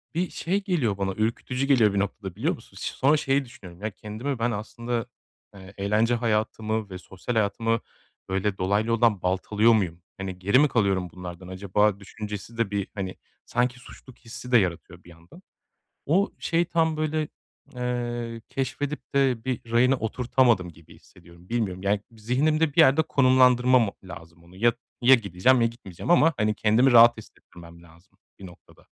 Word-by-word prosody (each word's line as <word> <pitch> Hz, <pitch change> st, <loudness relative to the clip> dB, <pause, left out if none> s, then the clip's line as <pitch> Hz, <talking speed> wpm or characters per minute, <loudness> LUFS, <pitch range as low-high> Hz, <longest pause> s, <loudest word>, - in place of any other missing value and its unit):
bir 180 Hz, +2 st, 0 dB
şey 195 Hz, +4 st, -2 dB
geliyor 135 Hz, -, 0 dB
bana 95 Hz, -1 st, -2 dB
ürkütücü 115 Hz, +5 st, -2 dB
geliyor 115 Hz, -7 st, +4 dB
bir 100 Hz, -, 0 dB
noktada, 100 Hz, -2 st, -4 dB
biliyor 145 Hz, +11 st, 0 dB
musun? 105 Hz, -4 st, -17 dB
Sonra 145 Hz, +4 st, +1 dB
şey 135 Hz, -1 st, 0 dB
düşünüyorum, 95 Hz, -5 st, -14 dB
ya, 110 Hz, -, -2 dB
kendimi 115 Hz, +7 st, -5 dB
ben, 120 Hz, +1 st, 0 dB
aslında, 115 Hz, +2 st, -4 dB, 0.5 s
ııı, 95 Hz, 0 st, -13 dB
eğlence 105 Hz, +4 st, +1 dB
hayatımı 110 Hz, -1 st, -1 dB
ve 95 Hz, -, -7 dB
sosyal 95 Hz, +5 st, -6 dB
hayatımı 115 Hz, +2 st, +1 dB, 0.5 s
öyle 95 Hz, +1 st, -1 dB
dolaylı 100 Hz, +4 st, 0 dB
yoldan 115 Hz, -4 st, +2 dB
baltalıyor 105 Hz, +5 st, +2 dB
muyum? 90 Hz, -5 st, -1 dB, 0.2 s
Hani, 95 Hz, -2 st, -6 dB
geri 100 Hz, +8 st, +3 dB
mi 150 Hz, -, +5 dB
kalıyorum 95 Hz, -8 st, 0 dB
bunlardan 90 Hz, 0 st, -9 dB
acaba 100 Hz, +2 st, 0 dB
düşüncesi 105 Hz, +2 st, -8 dB
de 110 Hz, -3 st, -1 dB
bir, 100 Hz, -1 st, -2 dB
hani, 95 Hz, -2 st, -4 dB, 0.3 s
sanki 125 Hz, +1 st, -1 dB
suçluluk 125 Hz, 0 st, -15 dB
hissi 125 Hz, +1 st, -10 dB
de 120 Hz, -, +7 dB
yaratıyor 90 Hz, -2 st, -2 dB
bir 85 Hz, -, -16 dB
yandan. 85 Hz, 0 st, -17 dB, 0.6 s
O 185 Hz, +7 st, +2 dB
şey 170 Hz, +1 st, +1 dB
tam, 160 Hz, -2 st, 0 dB
böyle, 155 Hz, 0 st, -1 dB, 0.5 s
eee, 120 Hz, -2 st, -3 dB
keşfedip 140 Hz, +2 st, -4 dB
de 130 Hz, -4 st, +1 dB
bir 120 Hz, -2 st, -4 dB
rayına 125 Hz, +3 st, +4 dB
oturtamadım 120 Hz, -4 st, +1 dB
gibi 80 Hz, 0 st, -18 dB
hissediyorum, 85 Hz, +1 st, -19 dB
bilmiyorum. 100 Hz, -6 st, -2 dB
Yani, 100 Hz, +1 st, +1 dB
zihnimde 140 Hz, +7 st, 0 dB
bir -, -, -1 dB
yerde 150 Hz, 0 st, +5 dB
konumlandırmamam 130 Hz, -4 st, +4 dB
o 95 Hz, -, -14 dB
lazım 85 Hz, -1 st, -12 dB
onu, 85 Hz, +2 st, -18 dB
ya 115 Hz, +4 st, +3 dB, 0.3 s
ya 130 Hz, +2 st, +7 dB
gideceğim 115 Hz, +3 st, +2 dB
ya 115 Hz, -, +4 dB
gitmeyeceğim 115 Hz, -, -6 dB
ama, 165 Hz, -2 st, +5 dB
hani, 105 Hz, 0 st, +1 dB
kendimi 110 Hz, +5 st, +3 dB
rahat 120 Hz, 0 st, +7 dB
hissettirmem 85 Hz, -5 st, -15 dB
lazım 85 Hz, +1 st, -22 dB, 0.2 s
bir 95 Hz, -, -10 dB
noktada. 85 Hz, -, -18 dB
115 Hz, 165 wpm, -25 LUFS, 95-125 Hz, 0.6 s, de